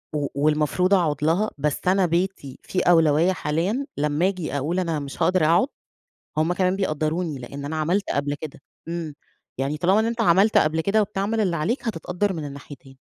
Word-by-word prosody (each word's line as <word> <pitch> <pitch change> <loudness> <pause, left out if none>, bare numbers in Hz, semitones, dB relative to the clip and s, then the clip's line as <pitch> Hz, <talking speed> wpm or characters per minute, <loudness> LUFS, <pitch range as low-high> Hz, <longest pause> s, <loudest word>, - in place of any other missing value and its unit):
و 145 -2 0
والمفروض 155 +6 +2
أقعد 155 -6 +1
لها 175 +8 +2
بس 145 0 -1
أنا 190 +1 +4
بيتي 170 -5 -2
في 185 - -2
أولوية 165 0 +4
حاليًا 180 - -1
لما 150 +5 +1
آجي 180 -7 -3
أقول 160 +7 -1
أنا 165 -4 -1
مش 140 -1 -8
هاقدر 180 -4 +3
أقعد 175 - +4 0.7
هم 160 +3 +2
كمان 185 +1 +1
بيقدروني، 155 -3 -1
لإن 140 +3 -8
أنا 155 +3 -3
عملت 175 +6 0
قبل 145 +1 -1
كده 150 -3 -8 0.3
إمم، 165 -3 -4 0.4
يعني 135 +3 -1
طالما 185 +7 +3
إن 220 - 0
أنت 230 0 -2
عملت 200 +1 +4
قبل 155 +1 +2
كده 200 +6 +2
وبتعمل 210 +2 -1
اللي 185 -5 +1
عليك 235 - -1
هتتقدر 185 +1 -2
من 160 -4 -5
الناحيتين. 140 -1 -11
165 Hz, 180 wpm, -23 LUFS, 150-190 Hz, 0.7 s, أنا